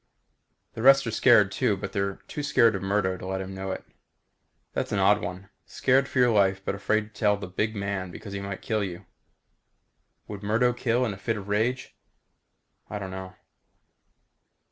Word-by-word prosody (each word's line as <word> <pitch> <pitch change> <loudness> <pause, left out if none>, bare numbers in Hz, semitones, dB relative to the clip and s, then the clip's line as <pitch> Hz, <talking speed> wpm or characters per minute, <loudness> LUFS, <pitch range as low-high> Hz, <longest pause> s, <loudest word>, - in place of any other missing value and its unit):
The 110 - -6
rest 135 +2 +6
are 115 - -2
scared 110 -4 +5
too, 110 -5 +1
but - - -5
they're 100 0 -1
too 150 - -5
scared 130 -6 +4
of 100 - -3
Murdo 95 -1 0
to 90 - -9
let 95 0 -2
him 95 0 -6
know 95 0 -5
it. 95 - -4 0.9
That's - - -2
an - - 0
odd 100 +2 +4
one. 90 +2 -6 0.2
Scared 135 +1 +2
for - - -6
your 125 -1 +5
life 95 -3 +3
but - - -1
afraid 105 +2 -1
to 105 - -15
tell 105 -2 +3
the 100 - -6
big 110 +5 -2
man 100 -2 -3
because 100 +3 -9
he 100 - -3
might 100 -1 -6
kill 110 -2 0
you. 95 0 -6 1.2
Would 100 -2 -7
Murdo 115 +4 +2
kill 120 0 +1
in 110 - -2
a - - -9
fit 110 +2 -2
of 100 -1 -8
rage? 115 +5 -1 0.9
I 105 - -4
don't 95 -2 -6
know. 95 0 -7
100 Hz, 190 wpm, -26 LUFS, 95-115 Hz, 1.2 s, rest